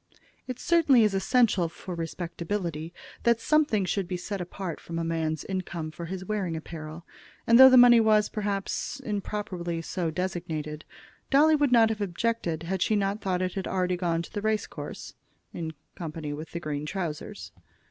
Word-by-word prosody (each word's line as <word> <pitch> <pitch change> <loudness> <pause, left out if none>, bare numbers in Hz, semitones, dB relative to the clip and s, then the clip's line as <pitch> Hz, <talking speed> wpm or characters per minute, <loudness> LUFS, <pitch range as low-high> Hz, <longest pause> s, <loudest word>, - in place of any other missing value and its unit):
It 255 -2 -4
certainly 315 -8 +4
is 210 -2 +2
essential 195 -3 +2
for 180 +2 -8
respectability 170 0 -4 0.3
that 235 -1 +3
something 285 -8 +2
should 190 0 -1
be 180 0 -3
set 195 +2 -4
apart 180 -1 -5
from 165 - -6
a 165 - -1
man's 160 -2 -1
income 175 -4 -4
for 170 +2 -7
his 185 +2 -5
wearing 190 -5 -2
apparel; 160 +1 -8 0.4
and 230 +1 +6
though 265 0 +11
the 255 - +7
money 245 -1 +8
was, 215 -1 +4
perhaps, 205 +4 -3
improperly 200 -6 -3
so 170 0 -2
designated, 160 -3 -4 0.4
Dolly 305 +3 +5
would 290 -3 +2
not 230 -2 +6
have 220 -1 -3
objected 180 -4 -1
had 185 +2 -2
she 215 - +2
not 200 +1 0
thought 185 -2 -1
that 185 0 0
it - - -14
had 195 -2 -3
already 185 -1 0
gone 170 -2 -1
to - - -12
the 205 - -3
race 215 0 0
course, - - -8 0.4
in 160 -1 -4 0.2
company 155 -3 -5
with 155 +2 -7
the 170 - -5
green 150 -2 -4
trousers. 170 -4 -5
185 Hz, 180 wpm, -27 LUFS, 165-215 Hz, 0.4 s, though